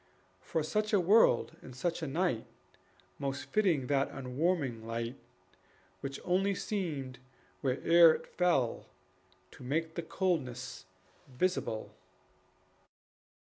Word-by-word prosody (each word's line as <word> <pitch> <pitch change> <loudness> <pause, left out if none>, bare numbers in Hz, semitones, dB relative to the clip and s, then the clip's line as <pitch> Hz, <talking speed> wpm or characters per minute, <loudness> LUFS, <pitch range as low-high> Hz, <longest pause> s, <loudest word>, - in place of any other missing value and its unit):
For 160 - -2
such 215 +7 -1
a 205 - +6
world 185 - +4
and 130 - -11
such 170 +6 -2
a 160 - -2
night 150 -5 0 0.7
Most 140 0 -3
fitting 180 -11 +2
that 140 +1 +1
unwarming 135 -2 -1
light, 115 +2 -3 0.8
Which 140 0 -5
only 195 +2 +2
seemed 150 - -3 0.4
where'er 165 +5 +6
it - - -8
fell 130 -11 0 0.6
To - - -13
make 160 +5 -1
the 170 - -3
coldness 135 -8 -2 0.4
visible. 130 -5 -2
150 Hz, 105 wpm, -32 LUFS, 130-180 Hz, 0.8 s, a